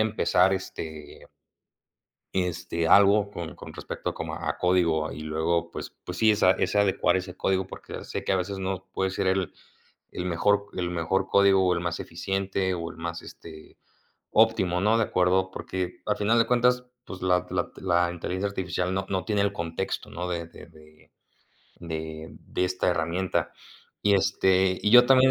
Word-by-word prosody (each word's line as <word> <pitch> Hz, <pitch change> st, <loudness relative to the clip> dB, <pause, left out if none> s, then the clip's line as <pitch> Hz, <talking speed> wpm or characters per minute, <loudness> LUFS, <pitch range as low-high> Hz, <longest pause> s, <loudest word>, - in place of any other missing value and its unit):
empezar, 100 Hz, -3 st, +3 dB
este 80 Hz, -5 st, -8 dB, 1.1 s
este, 90 Hz, -2 st, -1 dB
algo 100 Hz, +2 st, +5 dB
con 85 Hz, -5 st, -6 dB
con -, -, -10 dB
respecto -, -, -5 dB
como -, -, -5 dB
a -, -, -3 dB
código 85 Hz, -4 st, +2 dB
y 75 Hz, -, -8 dB
luego 80 Hz, +2 st, -1 dB
pues -, -, -8 dB
pues 90 Hz, 0 st, -6 dB
sí, 110 Hz, +2 st, +5 dB
es 105 Hz, -, 0 dB
a 90 Hz, -, +7 dB
es 100 Hz, -, 0 dB
adecuar 100 Hz, -2 st, +3 dB
ese 95 Hz, 0 st, -5 dB
código 95 Hz, 0 st, 0 dB
porque -, -, -9 dB
sé -, -, -5 dB
que -, -, 0 dB
a -, -, +3 dB
veces 95 Hz, +2 st, -3 dB
no 95 Hz, 0 st, -4 dB
puede 95 Hz, 0 st, 0 dB
ser 95 Hz, -, -2 dB
el 95 Hz, -1 st, 0 dB, 0.6 s
el 90 Hz, -, -4 dB
mejor 100 Hz, +4 st, +1 dB
el 90 Hz, -1 st, -2 dB
mejor 90 Hz, +3 st, 0 dB
código 100 Hz, -1 st, +4 dB
o 90 Hz, -, +3 dB
el 85 Hz, -, -2 dB
más 85 Hz, -2 st, -3 dB
eficiente 95 Hz, +2 st, -2 dB
o 85 Hz, -1 st, -4 dB
el 80 Hz, -, -12 dB
más, 85 Hz, 0 st, -5 dB
este, 80 Hz, -2 st, -13 dB, 0.5 s
óptimo, 100 Hz, -5 st, +3 dB
¿no?, 110 Hz, +3 st, +3 dB
de 115 Hz, -, +3 dB
acuerdo 95 Hz, +1 st, +1 dB
porque 90 Hz, -1 st, -5 dB
al 105 Hz, -, 0 dB
final 110 Hz, +3 st, +2 dB
de 115 Hz, -, +3 dB
cuentas, 125 Hz, +1 st, +2 dB, 0.2 s
pues 95 Hz, -, -9 dB
la 90 Hz, -1 st, +2 dB
la -, -, -2 dB
la 90 Hz, -1 st, +1 dB
inteligencia 90 Hz, +3 st, -3 dB
artificial 95 Hz, -1 st, -2 dB
no 95 Hz, 0 st, -1 dB
no 95 Hz, -1 st, -1 dB
tiene 105 Hz, -2 st, +1 dB
el 100 Hz, -, +1 dB
contexto, 85 Hz, +3 st, -4 dB
¿no?, 90 Hz, +1 st, -5 dB
de 85 Hz, -2 st, -3 dB
de -, -, -13 dB
de 75 Hz, -2 st, -20 dB, 0.7 s
de 80 Hz, -1 st, -6 dB
de -, -, -2 dB
esta 90 Hz, 0 st, 0 dB
herramienta, 85 Hz, +2 st, -1 dB, 0.5 s
y 100 Hz, -1 st, +4 dB
este 95 Hz, -1 st, +3 dB
y 105 Hz, -, +2 dB
yo 125 Hz, +1 st, +8 dB
también 130 Hz, 0 st, +6 dB
95 Hz, 180 wpm, -26 LUFS, 85-100 Hz, 1.1 s, yo